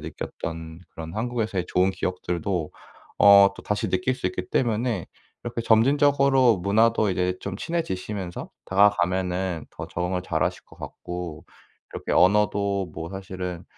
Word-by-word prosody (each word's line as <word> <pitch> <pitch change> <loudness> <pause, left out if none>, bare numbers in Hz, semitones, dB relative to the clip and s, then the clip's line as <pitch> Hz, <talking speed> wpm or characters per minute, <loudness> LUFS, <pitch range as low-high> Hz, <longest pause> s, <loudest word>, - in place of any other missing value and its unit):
느꼈던 80 0 -7
그런 80 +2 -8
한국에서의 110 -5 -2
좋은 95 +1 +2
기억들도 90 -2 -3 0.5
어 100 -1 +8
또 - - -11
다시 105 0 -1
느낄 95 +8 +1
수 95 - -3
있기 90 0 -4
때문에 115 -5 0 0.4
이렇게 120 -1 -3
점진적으로 135 +1 +4
문화도 110 +3 +2
이제 90 0 0
좀 100 -1 -5
친해지시면서 100 - -4 0.2
다가가면은 95 -3 +1
더 - - -7
적응을 90 +1 -2
잘하실 80 -4 -1
것 - - -18
같고 90 -3 -7 0.5
이렇게 - - -6
언어도 100 -2 +2
뭐 80 - -5
사실은 95 -2 -6
95 Hz, 320 characters per minute, -25 LUFS, 90-110 Hz, 0.5 s, 어